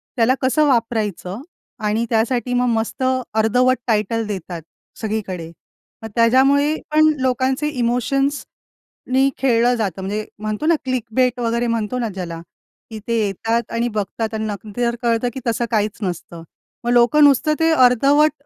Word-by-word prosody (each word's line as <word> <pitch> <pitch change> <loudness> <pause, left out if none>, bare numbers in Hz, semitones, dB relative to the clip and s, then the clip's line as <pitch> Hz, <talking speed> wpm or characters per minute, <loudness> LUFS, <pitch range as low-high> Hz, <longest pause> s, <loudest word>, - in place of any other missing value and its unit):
त्याला 245 +2 +3
कसं 265 +4 +2
वापरायचं 220 -5 -1 0.4
आणि 215 +2 0
त्यासाठी 240 +2 0
मग 250 0 +2
मस्त 230 +3 -2 0.3
अर्धवट 250 +4 +3
टायटल 220 +1 0
देतात 180 -4 -5 0.4
सगळीकडे, 195 -6 -3 0.6
मग - - -4
त्याच्यामुळे 270 +6 +4 0.2
पण 310 0 +5
लोकांचे 260 +3 0
इमोशन्सनी 270 +2 -2 0.7
खेळलं 245 -1 +2
जातं, 195 -5 -3
म्हणजे 210 +3 -3
म्हणतो 215 +7 -3
ना, 335 0 +4
क्लिकबेट 250 0 0
वगैरे 235 0 0
म्हणतो 230 +2 -1
ना 230 -2 -1
ज्याला, 170 -3 -6 0.5
की 220 -1 -7
ते 230 -1 +1
येतात 225 +4 -2
आणि 235 +1 0
बघतात 215 +1 -3
आणि 220 0 -2
न - - -2 0.2
नंतर 215 +3 -7
जर 235 0 +1
कळतं 235 +1 +1
की 265 - -5
तसं 235 +1 0
काहीच 210 -1 0
नसतं. 170 -2 -5 0.4
मग 240 - 0
लोकं 245 +5 +5
नुसतं 290 +2 +4
ते 325 0 +3
अर्धवट 280 +3 +4
235 Hz, 145 wpm, -20 LUFS, 215-255 Hz, 0.7 s, पण